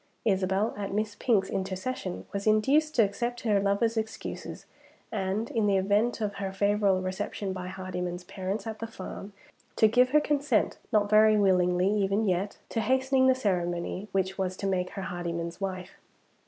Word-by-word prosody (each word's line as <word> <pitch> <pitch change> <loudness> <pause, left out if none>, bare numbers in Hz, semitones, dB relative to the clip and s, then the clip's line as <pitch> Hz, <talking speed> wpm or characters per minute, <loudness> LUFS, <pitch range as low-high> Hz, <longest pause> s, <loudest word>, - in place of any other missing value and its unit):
Isabel, 195 +1 +1
at 200 -1 -4
Miss 210 +1 -1
Pink's 205 -6 +2
intercession, 190 +1 -3
was 200 +1 -3
induced 280 +9 +3
to 230 - +6
accept 240 +4 -2
her 210 -4 +2
lover's 200 +4 +1
excuses, 220 0 -5 0.5
and, 205 +2 -2
in 220 -3 +1
the 200 -1 +3
event 205 +5 +1
of 205 -1 -1
her 195 -1 -3
favorable 200 -1 +2
reception 190 +1 -3
by 185 -1 -5
Hardyman's 180 -1 -4
parents 190 +4 -4
at 220 -1 -5
the 225 - -4
farm, 200 -1 -8 0.4
to 220 - +5
give 250 +3 +4
her 300 +3 +5
consent 295 -1 +1
(not 210 -1 +3
very 215 +1 +5
willingly 180 -2 +3
even 205 +1 +1
yet) 190 +2 -1
to 225 - -1
hastening 260 +3 +3
the 260 - +5
ceremony 180 -3 -2
which 190 0 -1
was 185 -1 -1
to - - -4
make 185 -2 0
her 195 - -6
Hardyman's 170 0 -4
wife. 185 -1 -4
200 Hz, 165 wpm, -28 LUFS, 185-220 Hz, 0.5 s, to